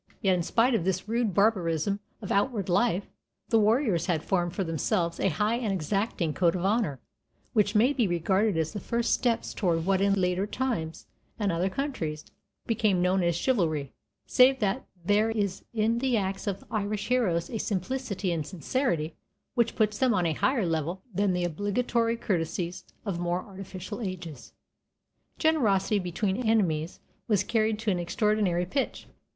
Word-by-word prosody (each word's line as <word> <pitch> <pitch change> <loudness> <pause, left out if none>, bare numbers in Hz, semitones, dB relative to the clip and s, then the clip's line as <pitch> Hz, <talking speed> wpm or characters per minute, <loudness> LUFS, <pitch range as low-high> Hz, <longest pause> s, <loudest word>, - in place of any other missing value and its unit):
Yet 190 -2 +3
in 180 - +1
spite 230 +8 +2
of 225 - +1
this 185 +1 -1
rude 225 -4 0
barbarism 195 -2 +2 0.2
of 195 - -4
outward 205 -2 +1
life, 195 +1 +2 0.4
the 225 - +4
warriors 215 - +2
had 165 -4 0
formed 175 -2 0
for 195 - 0
themselves 170 +1 -1
a 195 - +2
high 210 +6 +1
and 230 -4 -1
exacting 190 -1 -1
code 170 0 +2
of 180 0 -2
honor, 195 - +1 0.5
which 210 -1 +2
may 240 +7 +5
be 240 -7 +2
regarded 190 +3 +1
as 160 -1 -1
the 205 - -3
first 235 +3 0
steps 235 -2 0
toward 165 -5 0
what 190 0 +2
in 200 0 +3
later 180 +2 +1
times 215 -10 -3 0.3
and 205 -3 0
other 175 +3 0
countries 185 - -3 0.4
became 215 -5 +2
known 185 +1 +2
as 170 -1 +1
"chivalry"; 165 - 0 0.3
save 260 +1 +5
that 195 -3 -1 0.2
there 210 +3 +3
is 200 -4 -2
in 230 +1 +1
the 255 -2 +1
acts 195 0 -2
of 195 -2 -2
the - - -17
Irish 210 0 -2
heroes 215 -10 +1
a 225 - -3
simplicity 205 -1 -2
and 160 -3 -2
sincerity 170 - -1 0.4
which 235 -1 +1
puts 215 -2 +1
them 255 -4 +3
on 180 - +1
a 165 - +1
higher 240 - +1
level 165 +3 -2
than 195 0 +1
the 180 0 0
obligatory 230 +6 0
courtesies 175 -3 -2 0.2
of 190 -5 -2
more 175 +1 -1
artificial 195 +2 -8
ages. 180 - -6 0.8
Generosity 220 - +2
between 190 +2 -1
enemies 185 -9 +1 0.3
was 205 -4 +2
carried 220 -1 +1
to 220 -1 -1
an 180 - 0
extraordinary 185 -1 +1
pitch. 270 +9 -2
195 Hz, 170 wpm, -28 LUFS, 175-225 Hz, 0.8 s, may